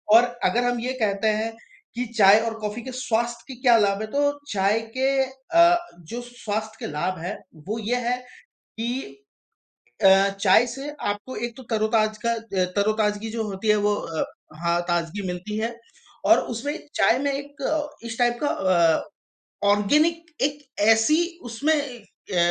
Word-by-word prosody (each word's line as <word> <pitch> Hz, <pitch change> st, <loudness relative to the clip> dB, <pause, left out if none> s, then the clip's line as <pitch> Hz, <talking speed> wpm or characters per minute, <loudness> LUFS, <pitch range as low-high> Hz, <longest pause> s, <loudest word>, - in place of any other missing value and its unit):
और 235 Hz, -, +8 dB, 0.2 s
अगर 240 Hz, +1 st, +2 dB
हम 245 Hz, 0 st, 0 dB
ये 250 Hz, +2 st, -2 dB
कहते 200 Hz, 0 st, +1 dB
हैं 225 Hz, +1 st, -2 dB, 0.4 s
कि 245 Hz, +1 st, -1 dB
चाय 200 Hz, 0 st, +8 dB
और 225 Hz, -, -1 dB
कॉफ़ी 210 Hz, +2 st, -4 dB
के 260 Hz, -, -6 dB
स्वास्थ्य 235 Hz, -1 st, -1 dB
के 265 Hz, -, -8 dB
क्या 240 Hz, -3 st, +6 dB
लाभ 200 Hz, -1 st, +2 dB
है? 220 Hz, -, -3 dB
तो 285 Hz, +4 st, 0 dB
चाय 200 Hz, +2 st, +2 dB, 0.2 s
के 265 Hz, +1 st, +2 dB
अ, 335 Hz, +7 st, +3 dB, 0.2 s
जो 200 Hz, +9 st, -7 dB
स्वास्थ्य 220 Hz, -3 st, -5 dB
के -, -, -4 dB
लाभ 175 Hz, +5 st, -2 dB
हैं, 180 Hz, +6 st, -4 dB, 0.3 s
वो 215 Hz, +3 st, -2 dB
ये 225 Hz, +3 st, -1 dB
है 250 Hz, +1 st, +1 dB, 0.6 s
कि, 240 Hz, +4 st, -2 dB, 1.0 s
अ 195 Hz, +1 st, +7 dB
चाय 200 Hz, +4 st, +5 dB
से 270 Hz, +4 st, -6 dB, 0.2 s
आपको 205 Hz, +6 st, -5 dB
एक 235 Hz, -1 st, -11 dB
तो 260 Hz, -, -10 dB
तरोताज़ा 215 Hz, -1 st, +1 dB, 0.3 s
का 185 Hz, -2 st, +2 dB
तरो-ताज़गी 210 Hz, +1 st, +1 dB
जो 225 Hz, 0 st, -2 dB
होती 205 Hz, +1 st, -4 dB
है, 210 Hz, -, +5 dB
वो 205 Hz, 0 st, +2 dB
अ, 165 Hz, -5 st, -3 dB, 0.4 s
हाँ 170 Hz, 0 st, +2 dB
ताज़गी 175 Hz, +3 st, -1 dB
मिलती 180 Hz, +4 st, -4 dB
है 230 Hz, +2 st, -2 dB, 0.5 s
और -, -, +7 dB, 0.2 s
उसमें 285 Hz, +7 st, -3 dB, 0.2 s
चाय 235 Hz, -, +4 dB
में 280 Hz, +1 st, 0 dB
एक 285 Hz, +1 st, -6 dB, 0.5 s
इस 230 Hz, 0 st, -6 dB
टाइप 240 Hz, -1 st, +2 dB
का 290 Hz, -, +2 dB
अ, 170 Hz, -4 st, +3 dB, 0.7 s
ऑर्गेनिक 305 Hz, +12 st, +3 dB, 0.2 s
एक 285 Hz, +1 st, 0 dB, 0.3 s
ऐसी 225 Hz, +7 st, +5 dB, 0.3 s
उसमें 285 Hz, +7 st, +1 dB
अ, 245 Hz, -9 st, -6 dB
225 Hz, 165 wpm, -24 LUFS, 205-250 Hz, 1.0 s, और